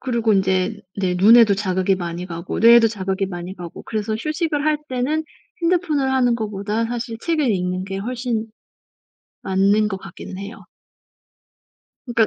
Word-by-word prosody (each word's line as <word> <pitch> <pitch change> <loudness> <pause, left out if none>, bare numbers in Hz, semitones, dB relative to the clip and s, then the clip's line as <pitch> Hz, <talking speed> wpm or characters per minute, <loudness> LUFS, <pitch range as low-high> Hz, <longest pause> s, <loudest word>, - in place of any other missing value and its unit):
그리고 235 -4 +1
인제 190 +2 +1 0.2
네 185 -2 0
눈에도 215 +3 +6
자극이 190 -1 0
많이 175 -1 -5
가고 170 -1 -5
뇌에도 230 0 +7
자극이 195 -2 -2
많이 175 0 -6
가고 175 -2 -9
그래서 215 0 -2
휴식을 305 +4 -2
할 310 0 +3
때는 270 +5 -1 0.4
핸드폰을 325 -6 +1
하는 245 -2 +3
것보다 210 0 -2
사실 230 -1 -4
책을 305 -3 0
읽는 185 -1 -1
게 195 0 -5
훨씬 235 +1 -3 1.0
맞는 200 +3 +2
것 195 - -3
같기는 190 0 -10
해요. 200 +3 -8 1.4
그니까 235 -3 +2
215 Hz, 315 characters per minute, -21 LUFS, 190-245 Hz, 1.4 s, 뇌에도